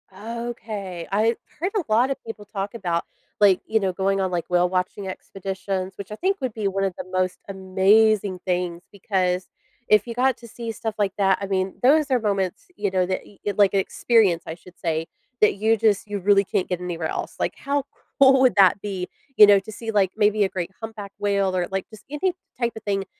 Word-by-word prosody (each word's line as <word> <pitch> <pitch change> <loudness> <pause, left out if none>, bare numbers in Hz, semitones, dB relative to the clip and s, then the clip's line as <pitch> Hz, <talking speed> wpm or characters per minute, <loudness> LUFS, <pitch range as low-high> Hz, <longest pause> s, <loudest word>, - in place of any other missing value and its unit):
Okay. 215 -5 -6
I 220 +3 +2 0.2
heard 370 +4 -1
a 405 - +1
lot 245 +5 +4
of - - -2
people 225 -2 -8
talk 200 -1 -5
about, 175 -7 -2 0.3
like, 200 -3 +5
you 220 - +1
know, 190 -3 -1
going 195 +1 0
on, 190 -1 0
like, 175 -2 -1
whale-watching 180 +2 0
expeditions, 190 0 -4
which 200 +1 -8
I - - -4
think 390 - 0
would 255 -4 -2
be 215 -3 -2
one 195 0 -1
of 190 -2 0
the - - -6
most 185 0 0
amazing 195 +1 +3
things 180 -1 -2
because 185 -2 -1 0.4
if 215 +1 +4
you 235 - -4
got 255 +1 +2
to 235 - -13
see 230 0 -6
stuff 220 -1 -4
like 200 -2 0
that, 195 -2 +3
I 200 - -3
mean, 190 -1 -1
those 290 +1 +4
are 255 - +4
moments, 200 - -2
you 205 -7 -1
know, 185 -1 +2
that 185 +1 -3
e 200 - -19 0.2
like 200 -2 +5
experience, 195 -2 +2
I 160 - -5
should 175 +1 -17
say, 165 -1 -1 0.3
that 210 - +5
you 220 +2 +2
just 215 -2 +1
you 205 -1 -3
really 200 +1 +4
can't 185 - -1
get 180 -1 -1
anywhere 175 -2 -3
else. - - -4
Like, - - -1
how 280 0 -1 0.4
cool 265 -1 +7
would 255 -2 +4
that 195 -1 +6
be, 190 -3 -4 0.3
you 210 - +10
know, 200 -1 +7
to 220 +3 -10
see, 225 +1 -5
like, 195 -3 +2
maybe 210 -1 +3
a 190 - +1
great 180 0 -4
humpback 215 -3 -7
whale 200 -2 +1
or, 180 -1 0
like, 195 -1 -3
just 215 -2 -14
any 345 +5 0 0.3
type 235 -1 0
of 220 - -9
thing 195 -1 -1
200 Hz, 215 wpm, -23 LUFS, 185-220 Hz, 0.4 s, you